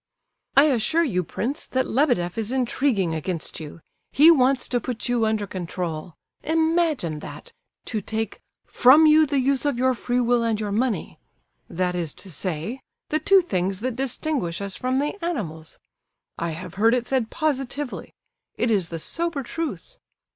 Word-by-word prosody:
"I 275 - +9
assure 305 +4 +2
you, 185 - 0
prince, 260 - -4
that 260 0 0
Lebedeff 240 - +1
is 225 0 -3
intriguing 245 - +1
against 160 +1 -3
you. 155 +1 -9 0.3
He 310 +4 +7
wants 265 -3 +3
to 245 - +1
put 250 -2 -4
you 240 -2 +2
under 215 -1 0
control. 175 -3 -5 0.3
Imagine 320 - +1
that! - - -10 0.3
To 220 -3 -3
take 220 +2 -4 0.2
'from 280 +6 +6
you 310 0 +6
the 280 0 0
use 270 0 +2
of 285 -4 0
your 260 +1 +3
free 245 +1 -1
will 240 0 +2
and 225 -2 0
your 210 -2 -3
money'—that 185 - -3
is 170 -4 -3
to 190 - -9
say, 180 - -4 0.3
the 310 - +1
two 385 +5 +5
things 190 - -2
that 255 -1 -2
distinguish 265 - -2
us 200 -1 -4
from 255 +1 -1
the 295 +7 -2
animals! 165 - -4 0.6
I 170 - -3
have 180 -1 -8
heard 230 +2 +5
it 245 -1 -1
said 255 -4 0
positively. 280 -2 -3 0.4
It 240 - +1
is 190 -6 +1
the 165 - -4
sober 335 - -3
truth." 280 - -5
240 Hz, 160 wpm, -24 LUFS, 185-280 Hz, 0.6 s, I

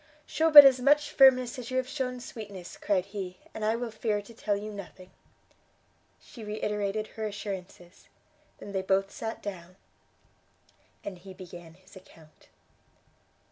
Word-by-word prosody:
"Shew 320 +1 +1
but 295 -2 +12
as 260 -2 +6
much 290 +3 +3
firmness 255 -1 +5
as 240 - -7
you 255 - -2
have 260 -1 0
shewn 255 -2 -4
sweetness," 205 -7 -9
cried 190 -3 0
he, 195 -2 -7 0.2
"and 220 - -6
I 220 +1 +1
will 235 0 -4
fear 215 -1 -1
to 205 +3 -12
tell 215 -2 -1
you 210 +1 -6
nothing." 185 -2 -11 1.1
She 230 - -13
reiterated 210 0 -2
her 220 -1 -5
assurances; 190 -3 -8 0.5
they 200 - -10
then 190 -1 -3
both 195 +1 +1
sat 225 0 -6
down, 185 -3 -8 1.3
and 190 -3 -7
he 190 +1 -12
began 175 -3 -12
his 185 +2 -20
account. 165 -4 -18
205 Hz, 150 wpm, -28 LUFS, 190-240 Hz, 1.3 s, but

